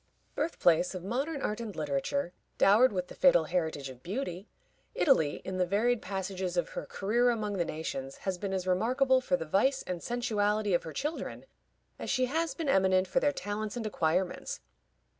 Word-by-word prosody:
Birth 315 Hz, +3 st, -2 dB
place 175 Hz, +2 st, +3 dB
of 180 Hz, -, -5 dB
modern 275 Hz, -, -2 dB
art 210 Hz, +1 st, -1 dB
and 225 Hz, -4 st, -6 dB
literature, 155 Hz, -, -1 dB, 0.2 s
dowered 225 Hz, +6 st, +6 dB
with 180 Hz, -2 st, -2 dB
the -, -, -10 dB
fatal 260 Hz, -12 st, +5 dB
heritage 160 Hz, -4 st, -2 dB
of 130 Hz, -2 st, -11 dB
beauty, 190 Hz, -, -4 dB, 0.5 s
Italy, 160 Hz, -, +3 dB
in 185 Hz, 0 st, -3 dB
the 180 Hz, -, +3 dB
varied 225 Hz, +5 st, +2 dB
passages 190 Hz, -1 st, -3 dB
of 175 Hz, -, +1 dB
her -, -, -6 dB
career 235 Hz, +5 st, +1 dB
among 210 Hz, -4 st, -1 dB
the 175 Hz, -, +1 dB
nations, 135 Hz, -4 st, -5 dB
has 190 Hz, -2 st, -1 dB
been 200 Hz, 0 st, -3 dB
as 190 Hz, -1 st, -2 dB
remarkable 255 Hz, +8 st, +3 dB
for 180 Hz, -8 st, +1 dB
the 165 Hz, -, -5 dB
vice 260 Hz, -, +2 dB
and 180 Hz, -2 st, -4 dB
sensuality 215 Hz, -4 st, 0 dB
of 175 Hz, -, +3 dB
her 160 Hz, -, -7 dB
children 300 Hz, -, -4 dB, 0.5 s
as -, -, -5 dB
she 255 Hz, -2 st, +2 dB
has 315 Hz, +2 st, -1 dB
been 320 Hz, 0 st, -3 dB
eminent 190 Hz, -5 st, +3 dB
for 225 Hz, -, +2 dB
their 290 Hz, -, +2 dB
talents 210 Hz, -2 st, -4 dB
and 230 Hz, -, -4 dB
acquirements. 180 Hz, -, -1 dB
200 Hz, 185 wpm, -30 LUFS, 180-245 Hz, 0.5 s, dowered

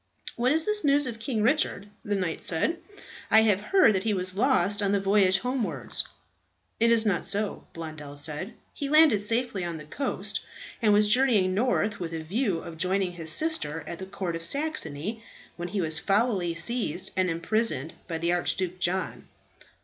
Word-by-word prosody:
"What 250 Hz, +2 st, +1 dB
is 320 Hz, +1 st, +2 dB
the 425 Hz, -, +1 dB
news 290 Hz, 0 st, +3 dB
of 235 Hz, -3 st, -5 dB
King 225 Hz, -2 st, -1 dB
Richard?" 260 Hz, -5 st, +1 dB, 0.2 s
the 205 Hz, -, -1 dB
knight 180 Hz, -4 st, -2 dB
said. 315 Hz, -, +1 dB, 0.5 s
"I 220 Hz, 0 st, +6 dB
have 205 Hz, -3 st, +3 dB
heard 375 Hz, -, +4 dB
that 190 Hz, -1 st, 0 dB
he 215 Hz, -2 st, +1 dB
was 185 Hz, 0 st, -3 dB
lost 205 Hz, -3 st, +2 dB
on 200 Hz, 0 st, +1 dB
the 200 Hz, -, +3 dB
voyage 195 Hz, -1 st, +3 dB
homewards." 220 Hz, -, -3 dB, 0.7 s
"It 230 Hz, -, +4 dB
is 230 Hz, -1 st, +5 dB
not 200 Hz, -5 st, +1 dB
so," 205 Hz, +1 st, -2 dB
Blondel 155 Hz, -3 st, -8 dB
said. 150 Hz, +7 st, -2 dB, 0.2 s
"He 280 Hz, -, -4 dB
landed 305 Hz, -9 st, +5 dB
safely 225 Hz, -2 st, -1 dB
on 170 Hz, -2 st, -4 dB
the 150 Hz, -, -10 dB
coast, 275 Hz, -, -3 dB, 0.4 s
and 215 Hz, -2 st, +4 dB
was 210 Hz, 0 st, +5 dB
journeying 215 Hz, -6 st, +3 dB
north 215 Hz, -1 st, 0 dB
with 170 Hz, -2 st, -5 dB
a 160 Hz, -, -5 dB
view 190 Hz, 0 st, -1 dB
of 170 Hz, -1 st, -9 dB
joining 185 Hz, +1 st, 0 dB
his 165 Hz, -2 st, -5 dB
sister 165 Hz, -, 0 dB
at 170 Hz, -, -7 dB
the 190 Hz, -, -6 dB
Court 185 Hz, -3 st, -4 dB
of 165 Hz, -, -6 dB
Saxony, 220 Hz, -, -2 dB, 0.3 s
when 175 Hz, 0 st, -5 dB
he 195 Hz, +2 st, -2 dB
was 160 Hz, -1 st, 0 dB
foully 195 Hz, -4 st, +1 dB
seized 190 Hz, -1 st, -2 dB
and 185 Hz, -1 st, +2 dB
imprisoned 165 Hz, -, -1 dB
by 165 Hz, -2 st, -3 dB
the 170 Hz, +2 st, 0 dB
Archduke 180 Hz, +1 st, -1 dB
John." 185 Hz, +1 st, -2 dB
195 Hz, 180 wpm, -27 LUFS, 170-230 Hz, 0.7 s, I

